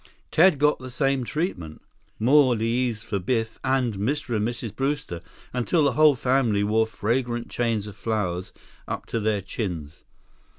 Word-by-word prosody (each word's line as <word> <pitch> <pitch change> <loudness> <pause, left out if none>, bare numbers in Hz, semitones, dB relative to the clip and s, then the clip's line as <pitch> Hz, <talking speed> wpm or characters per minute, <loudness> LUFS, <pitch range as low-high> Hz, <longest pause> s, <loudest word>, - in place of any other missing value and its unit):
Ted 170 -1 +5
got 150 +1 +3
the 130 0 -8
same 135 0 0
treatment. 105 - -3 0.4
More 130 +2 +5
leis 115 0 -1
for 100 -3 -2
Biff 115 +3 -1
and 130 -3 +1
Mr. 120 +5 -2
and 105 0 +1
Mrs. 115 -3 -5
Brewster, 135 - -2 0.3
until 125 +6 +1
the 140 - +3
whole 150 +1 +5
family 125 -5 +2
wore 110 +2 +2
fragrant 120 +2 -2
chains 115 -4 0
of 105 -2 -9
flowers 95 -4 -2 0.4
up - - -4
to 115 - -2
their 105 -1 0
chins. 90 -7 -5
115 Hz, 155 wpm, -25 LUFS, 105-135 Hz, 0.4 s, Ted